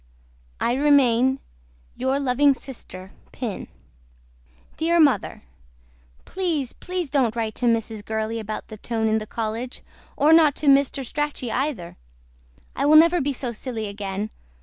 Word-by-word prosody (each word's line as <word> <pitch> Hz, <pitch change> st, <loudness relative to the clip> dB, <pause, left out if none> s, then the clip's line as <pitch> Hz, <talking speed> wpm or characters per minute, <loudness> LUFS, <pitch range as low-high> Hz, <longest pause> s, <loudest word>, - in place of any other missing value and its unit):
I 240 Hz, -, +1 dB
REMAIN 265 Hz, -3 st, +4 dB, 0.6 s
YOUR 260 Hz, +2 st, 0 dB
LUVING 275 Hz, +1 st, +3 dB
SISTER 190 Hz, -9 st, -10 dB, 0.2 s
PIN. 230 Hz, -6 st, -5 dB, 1.1 s
DEAR 335 Hz, +1 st, +1 dB
MOTHER 290 Hz, -5 st, +2 dB, 0.8 s
PLEASE 330 Hz, -9 st, -2 dB
PLEASE 360 Hz, -5 st, -4 dB
DON'T 250 Hz, -6 st, +1 dB
WRITE 225 Hz, -2 st, -2 dB
TO 245 Hz, -, -1 dB
MRS. 225 Hz, -2 st, 0 dB
GURLEY 220 Hz, +1 st, -3 dB
ABOUT 215 Hz, 0 st, -6 dB
THE 215 Hz, -, -8 dB
TONE 225 Hz, +1 st, -2 dB
IN 220 Hz, 0 st, +2 dB
THE 215 Hz, -, -8 dB
COLLEGE 230 Hz, +3 st, -4 dB, 0.3 s
OR 305 Hz, +3 st, +5 dB
NOT 310 Hz, -3 st, +6 dB
TO -, -, -5 dB
MR. 275 Hz, -1 st, +3 dB
STRACHEY 295 Hz, -3 st, -3 dB
EITHER. 255 Hz, -, -3 dB, 0.8 s
I -, -, -1 dB
WILL 310 Hz, +1 st, +8 dB
NEVER 335 Hz, +2 st, +6 dB
BE 280 Hz, +1 st, -1 dB
SO 250 Hz, -2 st, -4 dB
SILLY 230 Hz, -1 st, -5 dB
AGAIN. 200 Hz, 0 st, -4 dB
250 Hz, 140 wpm, -23 LUFS, 220-290 Hz, 1.1 s, WILL